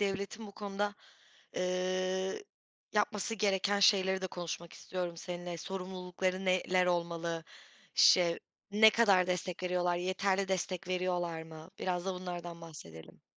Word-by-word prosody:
devletin 200 Hz, +2 st, -2 dB
bu 200 Hz, -, -11 dB
konuda, 205 Hz, 0 st, -2 dB, 0.6 s
eee, 185 Hz, -, -1 dB, 0.5 s
yapması 210 Hz, +1 st, 0 dB
gereken 200 Hz, -1 st, +2 dB
şeyleri 190 Hz, -1 st, +5 dB
de 190 Hz, -, -1 dB
konuşmak 170 Hz, -1 st, -5 dB
istiyorum 180 Hz, -2 st, -4 dB
seninle. 175 Hz, 0 st, -5 dB
Sorumlulukları 185 Hz, +1 st, -3 dB
neler 185 Hz, 0 st, +2 dB
olmalı? 170 Hz, -2 st, -1 dB, 0.5 s
Şey, 175 Hz, -2 st, +6 dB, 0.3 s
ne 220 Hz, +2 st, +8 dB
kadar 200 Hz, -6 st, +4 dB
destek 180 Hz, 0 st, -2 dB
veriyorlar? 180 Hz, -1 st, +1 dB
Yeterli 190 Hz, +2 st, 0 dB
destek 185 Hz, -1 st, -2 dB
veriyorlar 175 Hz, -3 st, -1 dB
mı? 160 Hz, 0 st, -11 dB
Biraz 180 Hz, -1 st, -1 dB
da 190 Hz, -, 0 dB
bunlardan 175 Hz, -2 st, -6 dB
bahsedelim. 85 Hz, -, -11 dB
185 Hz, 120 wpm, -33 LUFS, 175-190 Hz, 0.6 s, ne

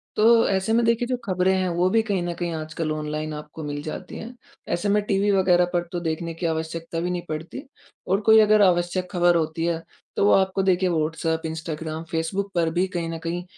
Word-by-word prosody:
तो 230 Hz, +1 st, +5 dB
ऐसे 195 Hz, +3 st, 0 dB
में 235 Hz, 0 st, +3 dB
देखिए 230 Hz, +1 st, +1 dB
जो 255 Hz, -, -1 dB
ख़बरें 185 Hz, -1 st, +2 dB
हैं 185 Hz, -1 st, 0 dB
वो 175 Hz, +2 st, +1 dB
भी 225 Hz, +3 st, +3 dB
कहीं 205 Hz, -4 st, -1 dB
न 175 Hz, -, -2 dB
कहीं 175 Hz, 0 st, -3 dB
आजकल 155 Hz, 0 st, -4 dB
ऑनलाइन 155 Hz, 0 st, -3 dB
आपको 150 Hz, +1 st, -8 dB
मिल 145 Hz, 0 st, -4 dB
जाती 170 Hz, +4 st, -7 dB
हैं, 240 Hz, +3 st, -8 dB, 0.3 s
ऐसे 200 Hz, +4 st, -1 dB
में 210 Hz, +1 st, +3 dB
टीवी 200 Hz, 0 st, +1 dB
वग़ैरह 180 Hz, -2 st, +4 dB
पर 175 Hz, 0 st, 0 dB
तो 175 Hz, -, -2 dB
देखने 165 Hz, 0 st, -3 dB
की 165 Hz, +2 st, -5 dB
आवश्यकता 165 Hz, +1 st, -3 dB
भी 175 Hz, +2 st, -1 dB
नहीं 180 Hz, -1 st, -2 dB
पड़ती 160 Hz, -, -6 dB, 0.4 s
और 195 Hz, +3 st, +1 dB
कोई 220 Hz, +1 st, +6 dB
अगर 215 Hz, 0 st, +5 dB
आवश्यक 180 Hz, -1 st, +2 dB
ख़बर 175 Hz, -1 st, +3 dB
होती 165 Hz, 0 st, -1 dB
है 170 Hz, -1 st, -1 dB, 0.3 s
तो -, -, +2 dB
वो -, -, +5 dB
आपको 190 Hz, 0 st, +2 dB
देखिए 185 Hz, -1 st, +2 dB
व्हाट्सऐप, 160 Hz, 0 st, -1 dB
इंस्टाग्राम, 160 Hz, 0 st, -5 dB
फ़ेसबुक 190 Hz, +5 st, -2 dB
पर 165 Hz, -2 st, +2 dB
भी 180 Hz, +2 st, +1 dB
कहीं 175 Hz, -3 st, -3 dB
न 165 Hz, -, -4 dB
कहीं 170 Hz, +2 st, -3 dB
175 Hz, 215 wpm, -24 LUFS, 160-195 Hz, 0.4 s, कोई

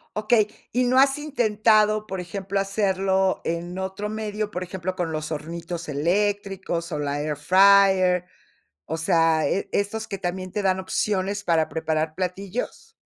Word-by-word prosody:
Okey. 215 Hz, 0 st, +3 dB, 0.2 s
¿Y 250 Hz, +1 st, +1 dB
no 255 Hz, +2 st, +4 dB
has 270 Hz, +1 st, +4 dB
intentado, 215 Hz, -6 st, +2 dB
por 190 Hz, -, -4 dB
ejemplo, 195 Hz, +2 st, -3 dB
hacerlo 190 Hz, -1 st, +1 dB
en 175 Hz, +2 st, -3 dB
otro 190 Hz, +2 st, -4 dB
medio, 215 Hz, -1 st, -3 dB
por 180 Hz, -3 st, -4 dB
ejemplo, 185 Hz, 0 st, -4 dB
con 175 Hz, -3 st, -2 dB
los 155 Hz, 0 st, -4 dB
hornitos 165 Hz, +2 st, -5 dB
eléctricos 190 Hz, +2 st, -1 dB
o 150 Hz, -, -2 dB
la 145 Hz, 0 st, -2 dB
air 150 Hz, 0 st, -2 dB
fryer? 185 Hz, +1 st, +5 dB, 0.6 s
O 160 Hz, -, -3 dB
sea, 165 Hz, -1 st, +2 dB
¿e 195 Hz, +1 st, -1 dB
estos 220 Hz, +2 st, -1 dB
que 195 Hz, -, -4 dB
también 185 Hz, 0 st, -4 dB
te 210 Hz, -, -2 dB
dan 190 Hz, -1 st, +1 dB
opciones 200 Hz, +1 st, -1 dB
para 165 Hz, -3 st, +2 dB
preparar 160 Hz, -1 st, -2 dB
platillos? 195 Hz, -, -4 dB
190 Hz, 150 wpm, -24 LUFS, 170-210 Hz, 0.6 s, fryer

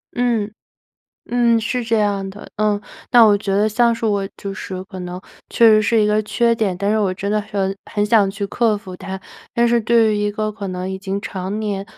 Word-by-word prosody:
嗯。 235 Hz, -4 st, 0 dB, 0.8 s
嗯， 235 Hz, -1 st, +3 dB
是 245 Hz, +3 st, -2 dB
这 225 Hz, -1 st, +1 dB
样 200 Hz, -2 st, 0 dB
的， 205 Hz, +2 st, -11 dB
呃， 210 Hz, -1 st, +1 dB, 0.3 s
那 240 Hz, -2 st, +8 dB
我 205 Hz, -1 st, +5 dB
觉 200 Hz, -1 st, -3 dB
得 210 Hz, +2 st, +3 dB
像 235 Hz, +2 st, +3 dB
是 230 Hz, 0 st, -2 dB
我 200 Hz, -2 st, +1 dB
就 195 Hz, -1 st, -6 dB
是 185 Hz, -1 st, -6 dB
可 190 Hz, -1 st, -9 dB
能 180 Hz, 0 st, -6 dB, 0.3 s
确 235 Hz, -, +5 dB
实 215 Hz, -1 st, +6 dB
是 225 Hz, +1 st, +2 dB
一 210 Hz, -, +3 dB
个 210 Hz, +1 st, +2 dB
缺 235 Hz, +2 st, +1 dB
点， 200 Hz, -5 st, -1 dB
但 200 Hz, -, -1 dB
是 215 Hz, +1 st, +2 dB
我 195 Hz, -3 st, +1 dB
真 200 Hz, +2 st, -3 dB
的 210 Hz, 0 st, +1 dB
说 195 Hz, -2 st, 0 dB, 0.2 s
很 205 Hz, -1 st, 0 dB
想 205 Hz, -3 st, +4 dB
去 200 Hz, 0 st, -4 dB
克 220 Hz, 0 st, +1 dB
服 190 Hz, -3 st, -10 dB
它。 190 Hz, +1 st, -7 dB, 0.3 s
但 235 Hz, 0 st, +2 dB
是 235 Hz, 0 st, +3 dB
对 220 Hz, -1 st, +3 dB
于 -, -, -1 dB
一 205 Hz, 0 st, 0 dB
个 215 Hz, 0 st, -3 dB
可 200 Hz, -2 st, -6 dB
能 185 Hz, 0 st, -4 dB
已 190 Hz, -, -3 dB
经 195 Hz, +1 st, -4 dB
常 190 Hz, +2 st, -4 dB
年 200 Hz, -2 st, -3 dB
210 Hz, 245 characters per minute, -19 LUFS, 195-225 Hz, 0.8 s, 那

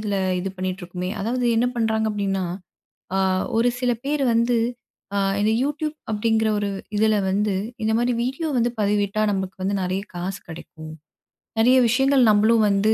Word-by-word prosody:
இதில 205 Hz, -2 st, -2 dB, 0.2 s
இது 195 Hz, -, -3 dB
பண்ணிட்டு 185 Hz, 0 st, -3 dB
இருக்கோமே! 180 Hz, +1 st, -5 dB
அதாவது 245 Hz, +4 st, -1 dB
என்ன 240 Hz, -, +3 dB
பண்றாங்க 220 Hz, -1 st, +1 dB
அப்பிடின்னா, 195 Hz, -2 st, -1 dB, 0.7 s
அ -, -, +2 dB, 0.4 s
ஒரு 240 Hz, +2 st, +4 dB
சில 250 Hz, -1 st, +1 dB
பேர் 285 Hz, -1 st, 0 dB
வந்து, 235 Hz, +1 st, +2 dB, 0.6 s
அ -, -, +1 dB, 0.2 s
இந்த 215 Hz, -, +3 dB
Youtube 305 Hz, +2 st, -2 dB, 0.2 s
அப்பிடிங்கிற 220 Hz, +1 st, +1 dB
ஒரு 205 Hz, -1 st, -1 dB, 0.3 s
இதில 220 Hz, 0 st, +3 dB
வந்து 205 Hz, 0 st, +1 dB, 0.3 s
இந்த 220 Hz, -, +1 dB
மாதிரி 245 Hz, +1 st, +1 dB
வீடியோ 270 Hz, +6 st, -2 dB
வந்து 240 Hz, +1 st, +2 dB
பதிவிட்டா 205 Hz, 0 st, +1 dB
நமக்கு 190 Hz, -1 st, -3 dB
வந்து 200 Hz, +1 st, 0 dB
நிறைய 185 Hz, +2 st, -1 dB
காசு 185 Hz, +3 st, -4 dB
கிடைக்கும். 160 Hz, -1 st, -10 dB, 0.7 s
நிறைய 250 Hz, +3 st, +5 dB
விஷயங்கள் 265 Hz, -1 st, +4 dB
நம்மளும் 215 Hz, +1 st, +4 dB
வந்து 205 Hz, +2 st, +3 dB
215 Hz, 160 wpm, -23 LUFS, 195-240 Hz, 0.7 s, நிறைய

